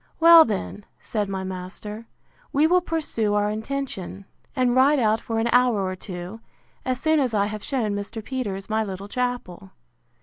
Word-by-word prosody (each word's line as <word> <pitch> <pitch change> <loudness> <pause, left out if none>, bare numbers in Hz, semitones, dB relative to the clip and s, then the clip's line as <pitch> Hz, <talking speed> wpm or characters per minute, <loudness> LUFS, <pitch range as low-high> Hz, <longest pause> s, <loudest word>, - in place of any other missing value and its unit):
Well 335 0 +9
then, 205 -1 -4
said 210 -3 -3
my 190 -1 -3
master, 190 +4 -7 0.4
we 290 +3 +3
will 360 +3 +4
pursue 295 -11 -1
our 205 0 +1
intention, 220 -5 -5 0.3
and 250 -2 +2
ride 275 +3 +5
out 220 -3 +2
for 225 - -3
an 225 +1 +1
hour 245 -5 +3
or 185 0 -3
two, 180 +2 -8 0.4
as 255 -1 -2
soon 315 +1 +2
as 250 -5 0
I 200 -1 +3
have 210 0 -5
shewn 240 -7 -1
Mr. 205 +2 -5
Peters 205 -8 -4
my 220 0 0
little 195 -1 -6
chapel. 245 - -4
220 Hz, 170 wpm, -24 LUFS, 200-255 Hz, 0.4 s, Well